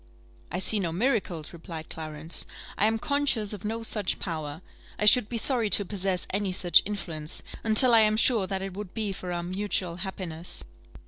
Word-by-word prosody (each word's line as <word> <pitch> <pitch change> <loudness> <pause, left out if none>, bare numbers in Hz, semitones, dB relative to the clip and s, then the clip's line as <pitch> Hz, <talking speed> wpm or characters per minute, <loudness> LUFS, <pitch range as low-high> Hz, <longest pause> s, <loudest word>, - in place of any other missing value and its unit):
"I 175 - -2
see 200 +3 +4
no 175 -4 -2
miracles," 185 - -1
replied 165 -1 -9
Clarence; 155 0 -5 0.3
"I 210 - +2
am 225 0 +1
conscious 255 -5 -1
of 205 - -8
no 225 +2 -3
such 210 -4 -1
power. 160 -2 -6 0.3
I 210 - -1
should 210 0 +6
be 235 - -3
sorry 230 -2 +2
to 205 - +2
possess 190 -2 0
any 200 -1 0
such 180 -1 +4
influence, 165 -7 -5 0.2
until 230 +3 +8
I 230 - +7
am 215 0 +3
sure 225 -4 +4
that 190 -1 -3
it 195 -1 -5
would 200 -1 -8
be 215 -3 -2
for 180 -1 -6
our 175 0 -3
mutual 185 -1 -2
happiness." 180 -3 -5
195 Hz, 185 wpm, -27 LUFS, 175-215 Hz, 0.3 s, until